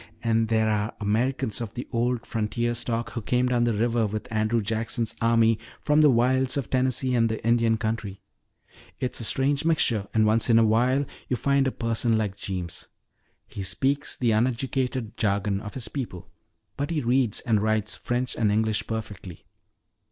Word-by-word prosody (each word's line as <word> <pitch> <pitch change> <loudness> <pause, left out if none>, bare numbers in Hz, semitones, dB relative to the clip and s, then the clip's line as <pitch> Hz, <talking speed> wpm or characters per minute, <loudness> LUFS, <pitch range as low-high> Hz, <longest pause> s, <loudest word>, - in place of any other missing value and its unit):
And 115 -1 +2
there 110 0 +2
are 105 +1 -1
Americans 110 +1 0
of 115 -4 -6
the 125 - -5
old 120 0 -1
frontier 115 +2 -1
stock 120 0 -1
who 115 - -4
came 125 +3 +1
down 120 -1 +2
river 115 0 +1
with 105 +1 -5
Andrew 110 +2 +1
Jackson's 115 +2 -1
army 115 -1 +3 0.2
from 150 +1 +3
the 150 - +6
wilds 130 +2 +2
of 135 -6 -4
Tennessee 130 0 +1
and 115 -2 +3
the 110 -1 -4
Indian 115 -1 +3
country. 110 -3 -3 0.8
It's 125 - -2
a - - -5
strange 140 +5 +1
mixture, 120 -11 +1
and 110 -1 +3
once 110 +3 +2
in 115 - +6
a 115 - +5
while 125 +6 +2 0.2
you 125 - 0
find 140 +1 +2
a - - 0
person 115 -1 +1
like 105 -3 -2
Jeems. 90 -3 -5 0.6
He 100 - -8
speaks 135 +10 -1
the 120 -3 +1
uneducated 125 +1 -1
jargon 100 -1 0
of 105 - -8
his 125 -4 -3
people 115 -9 -6 0.5
but 145 +1 -2
he 160 -3 -1
reads 125 -2 +1
and 110 -5 +1
writes 110 -1 0
French 125 +1 -2
and 105 -3 +1
English 110 0 0
perfectly. 105 -5 -6
115 Hz, 175 wpm, -25 LUFS, 110-125 Hz, 0.8 s, the